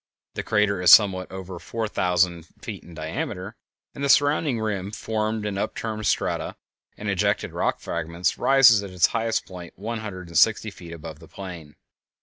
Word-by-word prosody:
The -, -, -3 dB
crater 100 Hz, -2 st, +1 dB
is 90 Hz, -, +6 dB
somewhat 95 Hz, -4 st, +6 dB
over 95 Hz, -1 st, -7 dB
four 115 Hz, +3 st, -3 dB
thousand 90 Hz, -4 st, +1 dB
feet -, -, -7 dB
in 85 Hz, -, -13 dB
diameter, 90 Hz, +6 st, -5 dB, 0.4 s
and 140 Hz, -, -6 dB
the 140 Hz, -, 0 dB
surrounding 145 Hz, -3 st, +3 dB
rim, 100 Hz, -3 st, -2 dB
formed 110 Hz, 0 st, -2 dB
of 105 Hz, -1 st, -2 dB
upturned 110 Hz, 0 st, -3 dB
strata -, -, -1 dB, 0.4 s
and 105 Hz, -, -6 dB
ejected 100 Hz, +1 st, 0 dB
rock -, -, -1 dB
fragments, 85 Hz, +1 st, -2 dB
rises 135 Hz, -6 st, +6 dB
at 100 Hz, -, -7 dB
its 90 Hz, -2 st, +3 dB
highest 115 Hz, 0 st, 0 dB
point 90 Hz, -2 st, -10 dB
one 110 Hz, +4 st, -4 dB
hundred 95 Hz, -5 st, -7 dB
and 85 Hz, -, -2 dB
sixty 110 Hz, -1 st, +3 dB
feet 85 Hz, -3 st, -12 dB
above 80 Hz, -2 st, -9 dB
the 80 Hz, -, -14 dB
plain. 85 Hz, -6 st, -9 dB
100 Hz, 170 wpm, -24 LUFS, 90-110 Hz, 0.4 s, is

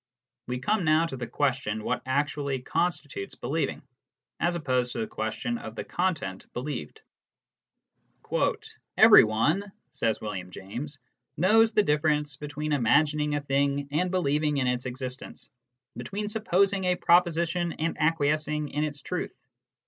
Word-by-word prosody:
We 125 Hz, -, -2 dB
come 205 Hz, +10 st, 0 dB
now 155 Hz, +1 st, +4 dB
to 165 Hz, -, -5 dB
the 120 Hz, -2 st, -5 dB
question 120 Hz, -5 st, -1 dB
what -, -, -1 dB
actually 140 Hz, 0 st, 0 dB
constitutes 145 Hz, -, -2 dB
believing, 145 Hz, +4 st, -2 dB, 0.6 s
as 175 Hz, 0 st, +1 dB
opposed 130 Hz, -6 st, 0 dB
to -, -, -6 dB
the 110 Hz, -, -1 dB
question 235 Hz, -, -3 dB
of -, -, -8 dB
the -, -, -4 dB
content 155 Hz, -, -2 dB
believed. 125 Hz, -, -5 dB, 2.0 s
"Everyone," 150 Hz, -, +6 dB, 0.2 s
says 110 Hz, -1 st, -1 dB
William 95 Hz, -4 st, -5 dB
James, 120 Hz, +11 st, -7 dB, 0.4 s
"knows 220 Hz, +6 st, +4 dB
the 210 Hz, -, +4 dB
difference 150 Hz, -3 st, +1 dB
between 150 Hz, +1 st, -4 dB
imagining 150 Hz, +3 st, +2 dB
a 145 Hz, -, -1 dB
thing 140 Hz, 0 st, 0 dB
and 180 Hz, +5 st, +1 dB
believing 150 Hz, -4 st, +1 dB
in 135 Hz, -, +1 dB
its 125 Hz, 0 st, -1 dB
existence, 130 Hz, 0 st, -7 dB, 0.5 s
between 210 Hz, +1 st, -4 dB
supposing 200 Hz, -2 st, +1 dB
a 180 Hz, 0 st, +3 dB
proposition 170 Hz, 0 st, +2 dB
and 165 Hz, +1 st, -2 dB
acquiescing 150 Hz, -1 st, +1 dB
in 150 Hz, +2 st, -1 dB
its 145 Hz, -1 st, -4 dB
truth. -, -, -4 dB
150 Hz, 135 wpm, -27 LUFS, 130-170 Hz, 2.0 s, Everyone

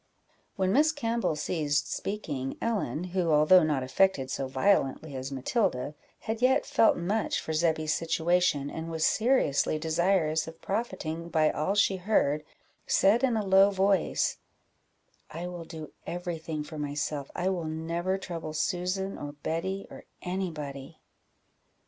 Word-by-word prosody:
'" -, -, -39 dB
When 190 Hz, 0 st, +1 dB
Miss 305 Hz, +4 st, +5 dB
Campbell 235 Hz, -, -1 dB
ceased 150 Hz, -1 st, -1 dB
speaking, 145 Hz, -10 st, -4 dB
Ellen, 200 Hz, -, -1 dB
who, 180 Hz, -3 st, +1 dB
although 155 Hz, +5 st, +6 dB
not 150 Hz, -5 st, +1 dB
affected 135 Hz, -1 st, +2 dB
so 135 Hz, -, -2 dB
violently 135 Hz, 0 st, +1 dB
as 130 Hz, +1 st, -5 dB
Matilda, 135 Hz, -, -1 dB, 0.3 s
had 220 Hz, +1 st, -4 dB
yet 260 Hz, +3 st, +3 dB
felt 280 Hz, -6 st, +4 dB
much 200 Hz, +6 st, 0 dB
for 160 Hz, -, -4 dB
Zebby's 155 Hz, -1 st, +1 dB
situation, 165 Hz, -3 st, +1 dB
and 160 Hz, +1 st, -5 dB
was 160 Hz, -1 st, 0 dB
seriously 220 Hz, -, +2 dB
desirous 160 Hz, 0 st, +1 dB
of 160 Hz, 0 st, -10 dB
profiting 180 Hz, -6 st, -3 dB
by 155 Hz, -2 st, +3 dB
all 155 Hz, +7 st, -1 dB
she 200 Hz, -2 st, +3 dB
heard, 165 Hz, -7 st, +1 dB, 0.4 s
said 220 Hz, +6 st, +4 dB
in 245 Hz, -4 st, +3 dB
a 210 Hz, -, -1 dB
low 195 Hz, +1 st, +6 dB
voice 195 Hz, -2 st, +1 dB, 0.9 s
"I 170 Hz, +3 st, -6 dB
will 175 Hz, -2 st, -6 dB
do 160 Hz, -2 st, -8 dB, 0.2 s
every 175 Hz, -1 st, -4 dB
thing 155 Hz, -1 st, -4 dB
for 155 Hz, 0 st, -8 dB
myself 145 Hz, -1 st, -3 dB
I 180 Hz, +2 st, 0 dB
will 180 Hz, -3 st, -2 dB
never 165 Hz, +4 st, -2 dB
trouble 165 Hz, -4 st, -6 dB
Susan, 185 Hz, +4 st, -1 dB
or 145 Hz, 0 st, -6 dB
Betty, 165 Hz, +6 st, -3 dB
or -, -, -11 dB, 0.2 s
any 185 Hz, +1 st, -2 dB
body." 140 Hz, -4 st, -7 dB
170 Hz, 150 wpm, -28 LUFS, 155-195 Hz, 0.9 s, although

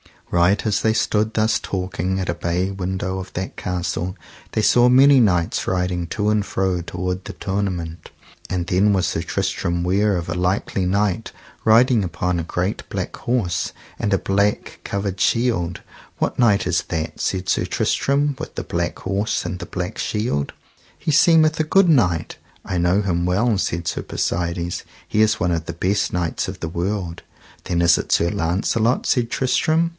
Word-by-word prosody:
Right 90 Hz, +5 st, +3 dB
as 105 Hz, -2 st, +2 dB
they 110 Hz, -, +2 dB
stood 110 Hz, 0 st, +1 dB
thus 110 Hz, 0 st, +2 dB
talking 95 Hz, -2 st, -2 dB
at 95 Hz, -, -2 dB
a -, -, +1 dB
bay 85 Hz, +2 st, -1 dB
window 95 Hz, 0 st, -3 dB
of 95 Hz, -1 st, -8 dB
that 95 Hz, +1 st, -5 dB
castle, 90 Hz, 0 st, -3 dB, 0.4 s
they 110 Hz, -, +1 dB
saw 120 Hz, +3 st, +5 dB
many 135 Hz, +2 st, +7 dB
knights 90 Hz, -7 st, +1 dB
riding 90 Hz, -2 st, -1 dB
to 105 Hz, +4 st, -1 dB
and 105 Hz, -1 st, +2 dB
fro 95 Hz, -3 st, -1 dB
toward 90 Hz, +2 st, -4 dB
the -, -, -6 dB
tournament. 95 Hz, -4 st, -3 dB, 0.4 s
And 90 Hz, -2 st, -1 dB
then 100 Hz, +3 st, +3 dB
was 95 Hz, -2 st, +1 dB
Sir -, -, -1 dB
Tristram 85 Hz, 0 st, -1 dB
ware 100 Hz, +3 st, +2 dB
of 85 Hz, -1 st, -3 dB
a -, -, -1 dB
likely 90 Hz, +1 st, 0 dB
knight 100 Hz, +3 st, 0 dB, 0.3 s
riding 115 Hz, +1 st, +5 dB
upon 90 Hz, 0 st, -1 dB
a -, -, -2 dB
great 90 Hz, +4 st, -2 dB
black -, -, -3 dB
horse, 95 Hz, -11 st, -1 dB, 0.3 s
and 105 Hz, -, 0 dB
a -, -, +4 dB
black 100 Hz, +2 st, 0 dB
covered 100 Hz, -1 st, -3 dB
shield. 115 Hz, -8 st, +1 dB, 0.4 s
What -, -, -2 dB
knight 110 Hz, -5 st, +4 dB
is -, -, +1 dB
that, 80 Hz, -1 st, -3 dB
said 95 Hz, 0 st, -2 dB
Sir -, -, +1 dB
Tristram, 140 Hz, 0 st, 0 dB
with -, -, -7 dB
the -, -, -3 dB
black 85 Hz, 0 st, -2 dB
horse 100 Hz, +3 st, -1 dB
and 90 Hz, +1 st, -4 dB
the -, -, -5 dB
black 90 Hz, +3 st, -4 dB
shield? 105 Hz, -, -1 dB, 0.4 s
he -, -, -2 dB
seemeth 160 Hz, +1 st, +5 dB
a -, -, +3 dB
good 195 Hz, +3 st, +4 dB
knight. 90 Hz, -, +2 dB, 0.3 s
I 90 Hz, -, -3 dB
know 90 Hz, +4 st, +2 dB
him 85 Hz, -3 st, 0 dB
well, 105 Hz, +5 st, +2 dB
said 85 Hz, -2 st, -2 dB
Sir 85 Hz, -, -2 dB
Persides, 85 Hz, 0 st, -2 dB, 0.2 s
he 110 Hz, -, +1 dB
is 110 Hz, 0 st, +2 dB
one 90 Hz, -, +2 dB
of 85 Hz, -1 st, -1 dB
the 85 Hz, -, -5 dB
best 95 Hz, +4 st, 0 dB
knights 90 Hz, -2 st, -1 dB
of -, -, -7 dB
the 85 Hz, -, -3 dB
world. 90 Hz, 0 st, -3 dB, 0.4 s
Then 85 Hz, -1 st, 0 dB
is 85 Hz, -1 st, +5 dB
it -, -, -1 dB
Sir 85 Hz, +1 st, +2 dB
Launcelot, 105 Hz, +8 st, 0 dB
said 120 Hz, -2 st, +1 dB
Tristram. 155 Hz, +7 st, +1 dB
95 Hz, 180 wpm, -21 LUFS, 85-110 Hz, 0.4 s, many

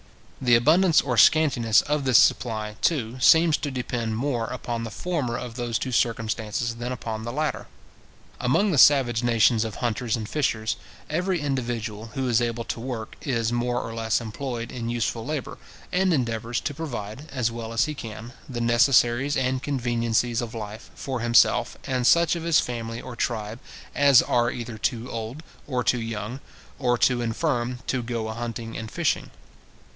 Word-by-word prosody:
The 125 Hz, -2 st, +5 dB
abundance 160 Hz, +8 st, +5 dB
or 125 Hz, -3 st, -2 dB
scantiness 120 Hz, -4 st, +5 dB
of 150 Hz, 0 st, -1 dB
this 130 Hz, -3 st, +5 dB
supply, 110 Hz, -3 st, +2 dB
too, 130 Hz, -6 st, 0 dB
seems 160 Hz, +3 st, +6 dB
to 145 Hz, -, -3 dB
depend 120 Hz, -4 st, -3 dB
more 120 Hz, -2 st, -1 dB
upon 120 Hz, -2 st, -4 dB
the 115 Hz, -, -4 dB
former 140 Hz, -4 st, -2 dB
of 125 Hz, -2 st, -6 dB
those 120 Hz, -1 st, -2 dB
two 130 Hz, -, -4 dB
circumstances 115 Hz, 0 st, -1 dB
than 120 Hz, +1 st, -4 dB
upon 115 Hz, -3 st, -4 dB
the 120 Hz, -, -4 dB
latter. 150 Hz, +3 st, -2 dB, 0.7 s
Among 195 Hz, +12 st, +2 dB
the 150 Hz, -, +2 dB
savage 125 Hz, -6 st, +5 dB
nations 115 Hz, -1 st, +3 dB
of 110 Hz, -2 st, -5 dB
hunters 120 Hz, -1 st, -1 dB
and 110 Hz, -3 st, -5 dB
fishers, 110 Hz, -7 st, -1 dB, 0.3 s
every 180 Hz, +3 st, 0 dB
individual 120 Hz, -6 st, -3 dB
who 135 Hz, -1 st, -1 dB
is 120 Hz, -1 st, +3 dB
able 120 Hz, -1 st, -1 dB
to 115 Hz, -, -5 dB
work 115 Hz, -2 st, -5 dB
is 115 Hz, -5 st, -1 dB
more 120 Hz, 0 st, 0 dB
or 115 Hz, -, -6 dB
less 115 Hz, -1 st, 0 dB
employed 120 Hz, +1 st, -5 dB
in 115 Hz, -2 st, -4 dB
useful 115 Hz, -1 st, -1 dB
labour, 145 Hz, +1 st, -4 dB, 0.3 s
and 185 Hz, +1 st, +2 dB
endeavours 120 Hz, -4 st, -1 dB
to -, -, -3 dB
provide, 135 Hz, -2 st, -6 dB
as 120 Hz, -4 st, 0 dB
well 115 Hz, -1 st, -6 dB
as 115 Hz, +1 st, +2 dB
he 155 Hz, -, -4 dB
can, 115 Hz, -2 st, -8 dB, 0.2 s
the 125 Hz, -2 st, -4 dB
necessaries 120 Hz, +3 st, +3 dB
and 130 Hz, 0 st, 0 dB
conveniencies 120 Hz, -3 st, 0 dB
of 115 Hz, -1 st, -6 dB
life, 105 Hz, -1 st, -7 dB
for 130 Hz, -2 st, -4 dB
himself, 115 Hz, 0 st, +3 dB
and 125 Hz, -2 st, 0 dB
such 170 Hz, +3 st, +4 dB
of 170 Hz, -, -4 dB
his 165 Hz, -1 st, +3 dB
family 115 Hz, -1 st, -4 dB
or 125 Hz, -1 st, -8 dB
tribe 110 Hz, -1 st, -3 dB, 0.3 s
as 140 Hz, -3 st, +6 dB
are 120 Hz, -1 st, +2 dB
either 120 Hz, -2 st, -6 dB
too 120 Hz, +2 st, -2 dB
old, 115 Hz, +7 st, -5 dB, 0.2 s
or 125 Hz, -3 st, -1 dB
too 125 Hz, 0 st, +1 dB
young, 115 Hz, +2 st, -5 dB, 0.4 s
or 120 Hz, -3 st, +2 dB
too 125 Hz, 0 st, +2 dB
infirm, 120 Hz, +1 st, -1 dB
to 130 Hz, -, -1 dB
go 115 Hz, -2 st, -3 dB
a -, -, -3 dB
hunting 115 Hz, -1 st, -5 dB
and 110 Hz, -1 st, -5 dB
fishing. -, -, -1 dB
120 Hz, 175 wpm, -25 LUFS, 115-135 Hz, 0.7 s, seems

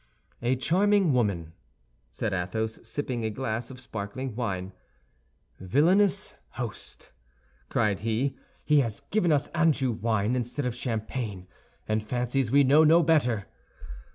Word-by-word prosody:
"A 120 Hz, +2 st, +1 dB
charming 185 Hz, +5 st, +3 dB
woman!" 95 Hz, -10 st, 0 dB, 0.6 s
said 100 Hz, -, -3 dB
Athos, 110 Hz, +5 st, -2 dB
sipping 130 Hz, -5 st, -3 dB
a 110 Hz, -, 0 dB
glass 110 Hz, 0 st, -3 dB
of 130 Hz, -1 st, -10 dB
sparkling 115 Hz, +1 st, -6 dB
wine. 95 Hz, -6 st, -3 dB, 0.9 s
"Villainous 180 Hz, -, +2 dB, 0.2 s
host!" 120 Hz, -4 st, -8 dB, 0.6 s
cried 105 Hz, -4 st, +1 dB
he, 115 Hz, +5 st, -1 dB, 0.3 s
"he 150 Hz, -1 st, +5 dB
has 115 Hz, -6 st, -1 dB
given 185 Hz, -5 st, +2 dB
us 145 Hz, -1 st, +1 dB
Anjou 155 Hz, -6 st, +2 dB
wine 110 Hz, +1 st, 0 dB
instead 125 Hz, +3 st, -2 dB
of 125 Hz, -, -1 dB
champagne, 110 Hz, -4 st, -4 dB, 0.4 s
and 110 Hz, 0 st, 0 dB
fancies 125 Hz, +2 st, -1 dB
we 140 Hz, +1 st, +6 dB
know 145 Hz, +4 st, +6 dB
no 165 Hz, +2 st, +6 dB
better! 125 Hz, -10 st, +2 dB
120 Hz, 125 wpm, -27 LUFS, 110-145 Hz, 0.9 s, we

